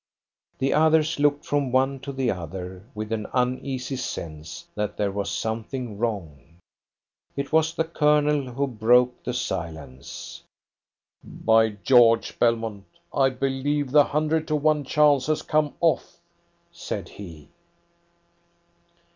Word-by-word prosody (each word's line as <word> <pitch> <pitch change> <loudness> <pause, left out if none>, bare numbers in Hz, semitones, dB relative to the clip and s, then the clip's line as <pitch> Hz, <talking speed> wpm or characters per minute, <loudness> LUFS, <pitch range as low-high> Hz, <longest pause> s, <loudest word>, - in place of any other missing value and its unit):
The 135 - +1
others 160 0 +3
looked 145 0 +2
from 145 -3 0
one 135 +1 +2
to 140 +1 -6
the 130 -3 0
other 90 +3 -7
with 110 +1 -5
an 110 -2 -2
uneasy 130 +1 -1
sense 80 -8 -6
that 105 -1 -3
there 100 -1 0
was 100 0 -3
something 115 0 -4
wrong. 85 - -4 0.8
It 140 0 -4
was 160 +1 +2
the 160 - +1
Colonel 150 -4 +2
who 140 +4 -1
broke 125 0 +3
the 125 - -3
silence. 80 - -6 0.8
"By 110 0 +2
George, 120 -3 +4
Belmont, 115 -4 0 0.3
I 135 -1 +3
believe 135 +2 -1
the 145 0 +6
hundred 155 +1 0
to 155 - 0
one 150 -1 +1
chance 145 -1 +3
has 155 0 0
come 150 -1 0
off!" 165 -2 +1 0.5
said - - -5
he. 85 -7 -11
130 Hz, 125 wpm, -25 LUFS, 105-145 Hz, 0.8 s, the